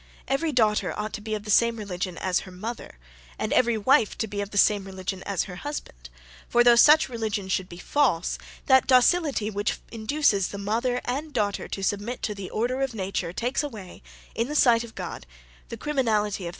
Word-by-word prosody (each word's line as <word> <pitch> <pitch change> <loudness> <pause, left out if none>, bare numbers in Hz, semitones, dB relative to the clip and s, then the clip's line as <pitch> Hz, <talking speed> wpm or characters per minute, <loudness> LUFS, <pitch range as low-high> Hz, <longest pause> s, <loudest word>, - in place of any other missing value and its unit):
'Every 305 +4 0
daughter 220 -5 +1
ought 210 0 -4
to 210 - -5
be 215 0 -3
of 210 - -6
the 210 - -3
same 235 +2 +4
religion 185 -4 -4
as 185 -1 0
her 185 - -10
mother, 210 - -7 0.4
and - - -2
every 235 -2 +3
wife 220 0 +3
to - - -1
be 205 0 -4
of 200 - -5
the 205 - -6
same 205 -1 +4
religion 190 0 -5
as 200 -3 0
her 180 -3 -9
husband: 120 - -7 0.4
for, 240 - +4
though 240 0 +7
such 300 +6 +7
religion 220 -5 -3
should 190 -1 -1
be 170 - -10
false, 180 - 0 0.3
that 265 -2 +5
docility 260 - +3
which 205 +1 -1
induces 220 -3 +1
the 200 - -7
mother 235 +5 -1
and 290 +5 -3
daughter 205 -3 -1
to 195 - -5
submit 205 +5 -2
to 210 - -1
the 195 -2 -7
order 250 +4 -1
of 270 -3 -1
nature, 190 -4 -3
takes 245 +9 -1
away, 215 -11 -8 0.3
in 230 - -1
the 300 - -5
sight 240 -5 +5
of 235 - -11
God, 175 - -7 0.4
the - - -6
criminality 230 -8 0
of 205 - -4
their 185 - -7
error'. - - -3
215 Hz, 210 wpm, -25 LUFS, 195-250 Hz, 0.4 s, though